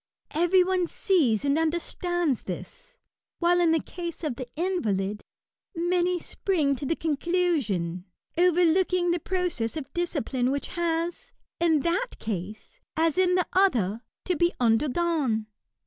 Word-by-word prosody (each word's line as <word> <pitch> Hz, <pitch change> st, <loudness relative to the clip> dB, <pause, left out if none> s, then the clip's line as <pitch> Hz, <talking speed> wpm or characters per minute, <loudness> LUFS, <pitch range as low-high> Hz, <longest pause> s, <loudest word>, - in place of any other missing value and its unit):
Every 350 Hz, +3 st, +4 dB
one 365 Hz, -1 st, +1 dB
sees 285 Hz, -, +1 dB
and 280 Hz, +2 st, +2 dB
understands 340 Hz, -, 0 dB
this; -, -, -8 dB, 0.4 s
while 350 Hz, 0 st, +3 dB
in 340 Hz, -2 st, +4 dB
the 325 Hz, -, +3 dB
case 340 Hz, 0 st, -7 dB
of 295 Hz, -6 st, -1 dB
the 255 Hz, -1 st, -7 dB
invalid, 210 Hz, -, -1 dB, 0.5 s
many 350 Hz, +1 st, +1 dB
spring 315 Hz, -7 st, 0 dB
to 275 Hz, -, -4 dB
the 330 Hz, -, +1 dB
conclusion, 290 Hz, -, 0 dB, 0.3 s
overlooking 355 Hz, +1 st, +3 dB
the 345 Hz, -, +1 dB
process 335 Hz, -9 st, -1 dB
of 285 Hz, -4 st, -7 dB
discipline 285 Hz, -7 st, -1 dB
which 280 Hz, +1 st, -2 dB
has, 340 Hz, 0 st, -2 dB, 0.3 s
in 320 Hz, -4 st, +3 dB
that 355 Hz, -, -1 dB
case, 210 Hz, -, -6 dB, 0.2 s
as 325 Hz, -1 st, +2 dB
in 360 Hz, -1 st, +4 dB
the 365 Hz, -, +2 dB
other, 235 Hz, -, +2 dB, 0.2 s
to 365 Hz, -, +1 dB
be 345 Hz, +3 st, +2 dB
undergone. 250 Hz, 0 st, +1 dB
330 Hz, 130 wpm, -26 LUFS, 260-355 Hz, 0.5 s, Every